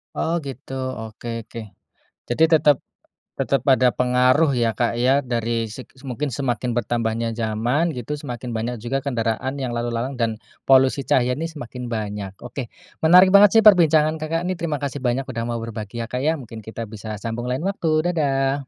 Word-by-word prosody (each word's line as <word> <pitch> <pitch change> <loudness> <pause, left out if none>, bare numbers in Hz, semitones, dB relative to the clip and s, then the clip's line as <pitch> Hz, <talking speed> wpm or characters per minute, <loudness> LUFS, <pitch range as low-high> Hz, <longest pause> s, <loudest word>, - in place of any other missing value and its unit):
Oh 165 - -1
gitu, 135 0 -8
oke 120 -3 -6 0.2
oke. 115 - -8 0.7
Jadi 120 +7 +1
tetep 150 -3 +4 0.6
tetep 140 -3 +1
ada 130 -2 +5
pengaruh 125 +4 +3
ya, 115 -3 0
Kak, 120 -1 0
ya, 135 +3 +3
dari 115 -2 -2
seg 130 +3 -9 0.2
mungkin 140 +2 -3
semakin 125 -3 -2
bertambahnya 115 0 -1
zaman 120 +8 0
gitu 125 +4 -4
semakin 125 -3 -6
banyak 115 +2 -2
juga 135 +3 -1
kendaraan 125 0 -2
yang 130 -3 -3
lalu 120 0 -2
lalang 125 +3 -3
dan 115 -2 0 0.3
polusi 135 +1 +5
cahaya 125 -1 +3
ini 165 - -2
semakin 125 -6 -8
banyak. 105 -4 -4
Oke, 125 0 -6 0.3
menarik 180 +4 +7
banget 200 0 +8
sih 225 - +7
perbincangan, 160 -6 +5
Kakak, 165 +2 -2
ini 185 - 0
terima 155 -3 -1
kasih 140 0 -3
banyak 125 +1 0
udah 115 -1 -3
mau 120 -1 -2
berbagi 115 0 -5
ya, 115 - -9
Kak, 125 - -2
ya, 160 +3 +2
mungkin 115 -5 -9
kita 110 +2 -7
bisa 110 0 -6
sambung 115 +3 -5
lain 130 +6 -2
waktu, 170 -3 0
dadah. 135 -4 +1
125 Hz, 175 wpm, -22 LUFS, 115-145 Hz, 0.7 s, banget